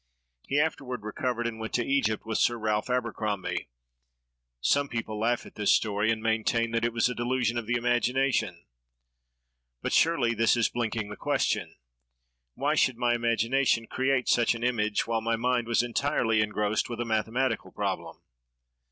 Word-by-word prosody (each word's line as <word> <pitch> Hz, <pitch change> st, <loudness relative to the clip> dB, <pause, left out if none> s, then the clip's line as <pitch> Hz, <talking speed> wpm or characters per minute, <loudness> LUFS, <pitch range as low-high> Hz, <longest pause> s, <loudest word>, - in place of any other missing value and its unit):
"He 140 Hz, -, +1 dB
afterward 130 Hz, -7 st, -2 dB
recovered, 120 Hz, +2 st, -2 dB
and 115 Hz, -1 st, -3 dB
went 110 Hz, 0 st, -5 dB
to 120 Hz, -, +1 dB
Egypt 120 Hz, -7 st, 0 dB
with 110 Hz, -1 st, -1 dB
Sir 120 Hz, -, +2 dB
Ralph 110 Hz, 0 st, -1 dB
Abercrombie. 110 Hz, -, -2 dB, 0.9 s
Some 140 Hz, -, +2 dB
people 110 Hz, -2 st, -4 dB
laugh 120 Hz, +2 st, 0 dB
at -, -, -13 dB
this 105 Hz, -1 st, +3 dB
story, 105 Hz, 0 st, 0 dB
and 110 Hz, -1 st, 0 dB
maintain 115 Hz, +1 st, +1 dB
that 115 Hz, 0 st, 0 dB
it 120 Hz, -, +1 dB
was 115 Hz, +1 st, +2 dB
a 125 Hz, -, -2 dB
delusion 120 Hz, 0 st, 0 dB
of 120 Hz, -2 st, -3 dB
the 120 Hz, -, +1 dB
imagination; 120 Hz, -5 st, 0 dB, 1.2 s
but -, -, -1 dB
surely 140 Hz, -8 st, +3 dB
this 115 Hz, +1 st, +3 dB
is 115 Hz, -, +2 dB
blinking 115 Hz, -3 st, -2 dB
the 105 Hz, -, -6 dB
question! -, -, -1 dB, 0.8 s
Why -, -, 0 dB
should 130 Hz, -3 st, +2 dB
my 120 Hz, -1 st, +2 dB
imagination 115 Hz, +1 st, +1 dB
create 130 Hz, +1 st, 0 dB
such 120 Hz, 0 st, +3 dB
an 115 Hz, -, -6 dB
image, 110 Hz, -4 st, +1 dB
while 115 Hz, -1 st, -1 dB
my 115 Hz, +1 st, 0 dB
mind 120 Hz, 0 st, 0 dB
was 115 Hz, +1 st, +2 dB
entirely 120 Hz, -3 st, +1 dB
engrossed 105 Hz, +1 st, 0 dB
with 120 Hz, -1 st, -5 dB
a 120 Hz, -, -1 dB
mathematical 115 Hz, +4 st, -1 dB
problem?" -, -, -4 dB
115 Hz, 165 wpm, -28 LUFS, 110-125 Hz, 1.2 s, this